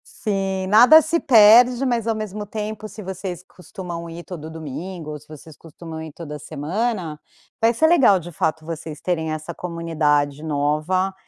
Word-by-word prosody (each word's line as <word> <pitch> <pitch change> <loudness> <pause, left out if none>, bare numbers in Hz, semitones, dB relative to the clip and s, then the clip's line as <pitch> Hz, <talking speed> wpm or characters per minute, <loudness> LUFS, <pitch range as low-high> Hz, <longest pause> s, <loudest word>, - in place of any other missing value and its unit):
Sim. 195 -3 -2
Nada 245 +10 +8
se 320 +3 0
perde, 245 +1 +6
mas, 235 -3 -1
ao 225 - +1
mesmo 210 -1 -5
tempo, 215 +1 -5
se 210 +1 -10
vocês 185 -2 -6
costumam 180 -2 -9
ir 170 +1 -8
todo 160 -4 -8
domingo, 160 +2 -7
ou 150 - -7
se 150 - -22
vocês 155 0 -13
costumam 165 0 -10
ir 160 -1 -8
toda 150 -1 -8
semana, 165 - -3 0.4
vai 225 +1 +4
ser 315 +7 +3
legal, 270 - +5
de 175 +1 -10
fato, 160 0 -2
vocês 160 -1 -7
terem 160 -3 -2
essa 155 +2 -5
comunidade 155 -4 -1
nova, 155 +6 0
175 Hz, 165 wpm, -21 LUFS, 155-210 Hz, 0.4 s, Nada